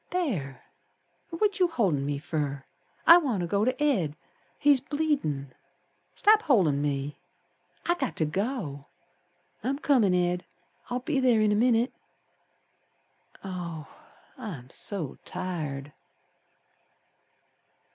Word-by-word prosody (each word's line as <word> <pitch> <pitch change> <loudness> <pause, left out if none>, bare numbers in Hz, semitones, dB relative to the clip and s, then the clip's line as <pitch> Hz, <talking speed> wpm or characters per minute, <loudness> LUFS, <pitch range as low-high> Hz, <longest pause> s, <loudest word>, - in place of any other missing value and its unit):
There! 195 - -2 0.7
What 405 +4 0
you 365 - +5
holdin' 185 - 0
me 145 -1 -1
fer? 145 -2 -3 0.4
I 335 - +10
want 260 - 0
ter - - -1
go 200 +4 +1
to 255 +3 0
Ed, 185 - +1 0.4
He's 285 -3 +4
bleedin'. 270 - -1 0.6
Stop 430 +1 +5
holdin' 185 - +3
me. 145 0 -2 0.7
I 345 - +3
got 280 -8 -3
to 160 - +1
go. 160 - -3 0.8
I'm 265 +4 0
comin', 245 - +3
Ed. 180 0 +1 0.5
I'll 245 +1 -2
be 275 0 0
ther 245 -4 +4
in 215 -1 +3
a - - +3
minit. 235 +2 +3 1.5
Oh, 175 -5 -5 0.5
I'm 155 - -7
so 180 -10 -4
tired! 150 -6 -5
195 Hz, 115 wpm, -28 LUFS, -, 1.5 s, I